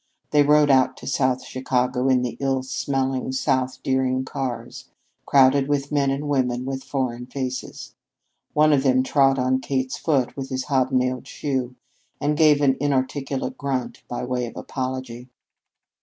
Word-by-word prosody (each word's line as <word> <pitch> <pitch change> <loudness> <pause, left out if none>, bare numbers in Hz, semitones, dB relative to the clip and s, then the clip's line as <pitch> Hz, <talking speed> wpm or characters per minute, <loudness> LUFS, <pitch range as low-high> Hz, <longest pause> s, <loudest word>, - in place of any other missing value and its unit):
They 150 - +5
rode 150 0 +5
out 130 -1 +3
to - - -11
South 130 -2 0
Chicago 125 0 0
on 125 -1 +3
the 125 - -3
ill 135 -1 0
smelling 130 0 -2
South 130 -1 -1
Deering 130 -1 0
cars, 125 -4 -5 0.4
crowded 135 0 +5
with 145 -1 -1
men 140 -2 +2
and 140 +2 -2
women 125 -3 0
with 135 0 -4
foreign 125 -3 -3
faces. 130 -1 -5 0.6
One 155 0 +4
of 140 - +3
the 130 -2 +3
men 130 - +3
trod 135 0 +3
on 130 0 +1
Kate's 130 -1 -2
foot 140 -6 0
with 135 -1 -5
his 130 0 -2
hobnailed 130 -2 0
shoe 130 -4 -3 0.4
and 150 +1 0
gave 150 -2 +5
an 135 -2 +3
inarticulate 135 -1 -1
grunt 135 -3 -3
by 120 - -4
way 125 -1 -2
of - - -10
apology. 130 -2 -5
130 Hz, 155 wpm, -23 LUFS, 130-140 Hz, 0.6 s, They